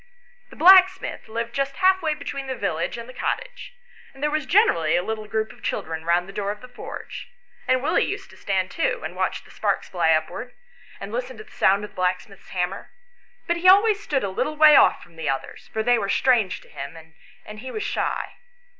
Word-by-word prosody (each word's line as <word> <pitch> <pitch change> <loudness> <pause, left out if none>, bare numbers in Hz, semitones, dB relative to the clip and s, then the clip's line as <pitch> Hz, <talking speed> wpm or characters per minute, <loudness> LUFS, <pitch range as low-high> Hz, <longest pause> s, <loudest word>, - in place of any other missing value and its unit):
The - - -14
blacksmith 375 +1 +5
lived 230 +1 -4
just 275 0 -2
half 375 0 +3
way 315 -2 0
between 275 -2 -6
the 260 - -3
village 175 -3 -2
and 235 0 -8
the 255 - -11
cottage, - - -4 0.4
and 270 - -10
there 300 - +1
was 305 -3 -2
generally 215 - +3
a 175 - +1
little 215 +1 -4
group 220 +1 -2
of - - -18
children 160 0 -4
round 175 +1 +2
the 195 - -10
door 200 0 -3
of 210 0 -5
the 250 - -11
forge; 245 - -9 0.4
and 255 0 +2
Willie 310 - +2
used 400 -1 -6
to - - -15
stand 190 -2 -1
too, 330 - -1
and - - -6
watch - - -2
the - - -18
sparks - - -1
fly 170 -3 +2
upwards, 160 +10 -2 0.4
and - - -7
listen - - -4
to - - -9
the - - -22
sound 195 +2 +2
of 210 - -7
the - - -26
blacksmith's 185 +2 -3
hammer; 180 +1 -3 0.6
but 340 0 0
he 365 +2 +5
always 415 +2 +5
stood 285 -9 -1
a 200 - -1
little 270 +11 -2
way 305 -1 +8
off - - +5
from 170 -2 -19
the 160 -3 -3
others, 135 0 -5
for 220 - -2
they 245 0 +3
were 200 -2 -3
strange 225 -5 +2
to - - -19
him, 140 +4 -8 0.5
and 210 0 -9
he 260 +3 -7
was 425 +9 -4
shy. - - -3
235 Hz, 220 wpm, -23 LUFS, 190-310 Hz, 0.6 s, way